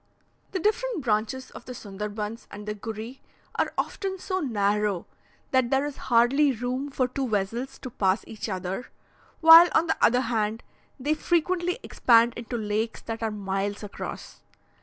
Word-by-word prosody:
The 375 - -2
different 430 - 0
branches 230 +3 -1
of - - -11
the 250 - -7
Sonderbunds 210 +1 -5
and 210 +1 -9
the 210 - -1
Gury 220 +4 -7 0.3
are - - 0
often 385 -1 -2
so 375 0 -2
narrow 210 - 0 0.5
that 260 -2 +3
there 270 +2 +2
is 290 -2 -5
hardly 260 +5 +3
room 250 +4 -3
for 260 -2 0
two 260 0 -3
vessels 225 +6 -2
to 255 - -8
pass 190 -2 +1
each 220 0 -6
other; 190 +4 -4 0.5
while, 330 +2 +10
on 325 - +4
the - - 0
other 250 +2 +5
hand, 225 -2 -1 0.4
they 290 +4 +1
frequently 345 +3 0
expand 235 -1 +4
into 240 +1 -5
lakes 215 +1 -2
that 225 0 -5
are 225 - 0
miles 200 0 -3
across. 205 - -7
235 Hz, 160 wpm, -26 LUFS, 210-275 Hz, 0.5 s, while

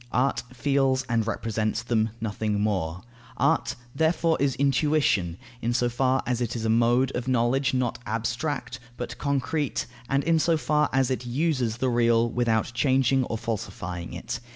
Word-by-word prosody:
Art 135 +2 +1
feels 135 0 +1
and 115 -2 0
represents 110 -1 -1
them. 115 -2 +1
Nothing 105 -1 -2
more. 90 -5 -1 0.3
Art - - +1 0.2
therefore 160 +1 +2
is 140 -2 +2
intuition, 135 - +2 0.2
in 120 +1 0
so 120 -1 +2
far 130 +2 +1
as 125 -1 -1
it 120 -1 -2
is 115 -1 -3
a - - +1
mode 120 +3 +3
of 125 0 -3
knowledge, 130 +2 +2
not 125 -3 -1
abstract, 120 +4 -2 0.2
but 120 - -6
concrete, 140 +1 -1 0.2
and 140 +1 +2
in 165 0 +3
so 165 +1 +2
far 150 0 +1
as 135 -1 +2
it 125 -1 -2
uses 130 -4 0
the 130 +1 0
real, 120 -1 +3
without 115 -1 0
changing 130 +1 +2
or 115 - -3
falsifying 90 -6 -5
it. 90 +7 -5
120 Hz, 160 wpm, -26 LUFS, 115-135 Hz, 0.3 s, mode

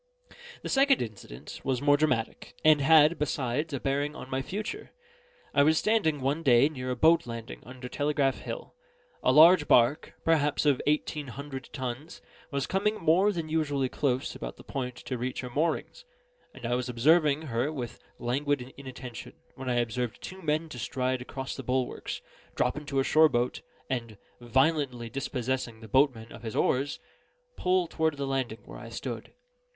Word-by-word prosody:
The - - -4
second 275 0 +4
incident 100 - -9
was 130 -2 0
more 145 +1 +4
dramatic, 145 -7 -1
and 155 -2 +6
had, 155 +2 +6
besides, 145 +1 -1
a 140 - -2
bearing 145 +2 -1
on 130 - -9
my 130 0 0
future. 215 - -5 0.6
I 140 - +5
was 155 +2 +4
standing, 160 -10 +2
one 140 +5 0
day, 135 -1 +5
near 130 -4 -5
a 125 - 0
boat 160 +3 +4
landing 115 -1 -7
under 125 +1 -9
Telegraph 145 -2 0
Hill. - - -7 0.5
A - - +3
large 160 +3 +7
barque, 125 +6 +3
perhaps 150 -2 +2
of 145 -3 +3
eighteen 150 -1 0
hundred 135 0 -7
tons, 130 +4 -5 0.3
was 140 -2 -1
coming 205 +3 +1
more 185 +4 +3
than 165 -5 -4
usually 145 -4 0
close 130 -2 -1
about - - -7
the - - -13
point 125 -2 -4
to 125 -3 -5
reach 125 +2 -3
her 125 -1 -7
moorings; 165 - -1 0.5
and - - -10
I 120 - 0
was 125 0 -1
observing 150 +4 +3
her 130 0 -1
with 125 -6 -6 0.2
languid 130 +1 -1
inattention, 130 -3 -8 0.2
when 130 -1 -6
I 125 - +1
observed 120 0 -1
two 190 0 -9
men 155 0 0
to 125 - -8
stride 130 +1 -1
across 130 +1 -5
the - - -5
bulwarks, 130 0 -2 0.3
drop 125 - +1
into 145 -2 -4
a - - +3
shore 155 +3 +5
boat, 120 -1 -1 0.3
and, 115 -5 -3 0.2
violently 125 -1 +1
dispossessing 130 -2 -3
the 110 - -11
boatman 125 -2 +2
of - - -10
his 110 -2 -6
oars, 140 +3 +1 0.6
pull 180 0 +2
toward 160 -2 0
the 140 - -2
landing 130 -4 -2
where - - -10
I - - -9
stood. - - -6
135 Hz, 170 wpm, -29 LUFS, 125-155 Hz, 0.6 s, large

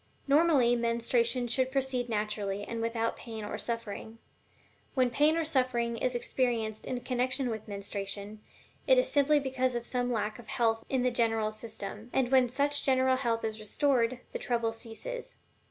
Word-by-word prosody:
Normally, 280 -5 +5
menstruation 235 +1 +1
should 255 +2 0
proceed 260 -3 0
naturally 210 -2 -2
and 230 +1 -4
without 230 0 -1
pain 225 -2 -7
or - - -4
suffering. 230 -1 -4 0.8
When 255 -2 +3
pain 300 +6 +3
or 330 - 0
suffering 250 -5 +1
is 250 +1 0
experienced 235 -3 -1
in 250 -1 -3
connection 255 0 0
with 220 0 -6
menstruation, 200 +1 -5 0.5
it - - +6
is - - +3
simply 290 +1 +4
because 260 -2 0
of 240 0 -3
some 245 0 -1
lack 215 -1 -2
of 235 - -12
health 225 -1 +1
in 260 -2 +1
the 250 - +2
general 225 -2 +1
system; 215 0 -7
and 260 -1 +1
when 260 -2 +5
such 285 +3 +1
general 260 -1 +3
health 235 -3 0
is 220 0 -3
restored, 250 +2 +1
the - - -4
trouble 230 -2 0
ceases. 355 - -6
240 Hz, 165 wpm, -30 LUFS, 225-260 Hz, 0.8 s, it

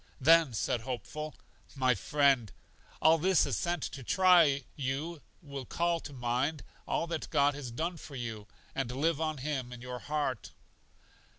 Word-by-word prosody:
Then 160 -3 +5
said 115 +2 0
Hopeful: 150 +5 -5 0.4
My 130 -2 +3
friend, 130 - +2 0.5
all 160 +1 +6
this 185 +1 +4
is - - -1
sent 175 -3 -1
to 135 - -5
try 180 +5 +6
if 140 -1 0
you 145 +4 -3 0.2
will 140 -3 -6
call 170 +3 0
to 150 - -9
mind 130 +4 -1 0.2
all - - 0
that 165 -2 -4
God 145 -2 +3
has 140 -3 -6
done 165 +9 -3
for 150 -3 -10
you, 110 -4 -5 0.3
and 135 -3 -2
live 155 +4 0
on 155 -1 -1
Him 135 -2 -3
in 125 - -8
your 125 0 -6
heart. 145 -5 -3
140 Hz, 165 wpm, -31 LUFS, 125-160 Hz, 0.5 s, all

